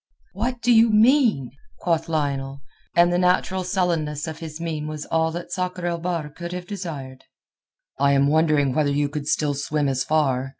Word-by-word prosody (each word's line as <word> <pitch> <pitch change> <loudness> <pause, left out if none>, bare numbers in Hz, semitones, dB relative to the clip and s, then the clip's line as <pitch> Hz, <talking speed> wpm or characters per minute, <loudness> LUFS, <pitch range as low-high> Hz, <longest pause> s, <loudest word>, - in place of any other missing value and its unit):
"What 240 +4 -3
do 240 +1 +4
you 225 0 +6
mean?" 220 - +3 0.3
quoth 165 -2 -1
Lionel, 140 -3 -2 0.3
and 175 0 +5
the 175 - +2
natural 185 +1 +1
sullenness 170 -5 -1
of 160 -1 -6
his 160 -2 -7
mien 160 -3 -3
was 155 -1 -5
all 160 0 +1
that 175 +1 -6
Sakr 180 -1 -3
el 170 -1 -1
Bahr 170 -3 -2
could 170 +3 -7
have 180 0 -5
desired. 155 -10 -7 0.7
"I 140 0 +4
am 140 0 +4
wondering 150 -2 +2
whether 150 +1 +1
you 145 0 0
could 145 0 -5
still 150 -2 +1
swim 145 +1 -1
as 135 -1 0
far. 135 -4 +1
160 Hz, 180 wpm, -23 LUFS, 145-180 Hz, 0.7 s, you